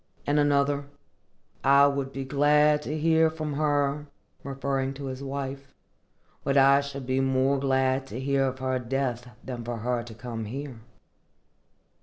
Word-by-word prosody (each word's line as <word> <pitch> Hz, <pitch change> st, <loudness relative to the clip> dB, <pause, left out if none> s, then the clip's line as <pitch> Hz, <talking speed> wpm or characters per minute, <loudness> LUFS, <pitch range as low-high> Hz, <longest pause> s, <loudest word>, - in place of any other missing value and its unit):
In 145 Hz, +1 st, +2 dB
another, 145 Hz, 0 st, +2 dB, 0.8 s
"I 140 Hz, +1 st, +6 dB
would 140 Hz, -1 st, 0 dB
be 135 Hz, 0 st, -5 dB
glad 150 Hz, +2 st, +3 dB
to 150 Hz, +1 st, -4 dB
hear 160 Hz, +1 st, +3 dB
from 155 Hz, -2 st, -4 dB
her 145 Hz, 0 st, 0 dB, 0.4 s
[his 135 Hz, 0 st, -3 dB
wife], 135 Hz, 0 st, -6 dB, 0.7 s
but 140 Hz, 0 st, +1 dB
I 140 Hz, +1 st, +6 dB
should 140 Hz, -2 st, -7 dB
be 130 Hz, +1 st, 0 dB
more 135 Hz, +1 st, +2 dB
glad 130 Hz, 0 st, +1 dB
to 120 Hz, 0 st, -6 dB
hear 135 Hz, 0 st, +1 dB
of 130 Hz, 0 st, -4 dB
her 130 Hz, 0 st, -1 dB
death 125 Hz, -1 st, -2 dB
than 125 Hz, -2 st, -6 dB
for 120 Hz, 0 st, -4 dB
her 120 Hz, +2 st, -1 dB
to 115 Hz, -1 st, -10 dB
come 115 Hz, -1 st, -6 dB
here." 130 Hz, +2 st, -6 dB
135 Hz, 145 wpm, -27 LUFS, 130-140 Hz, 0.8 s, I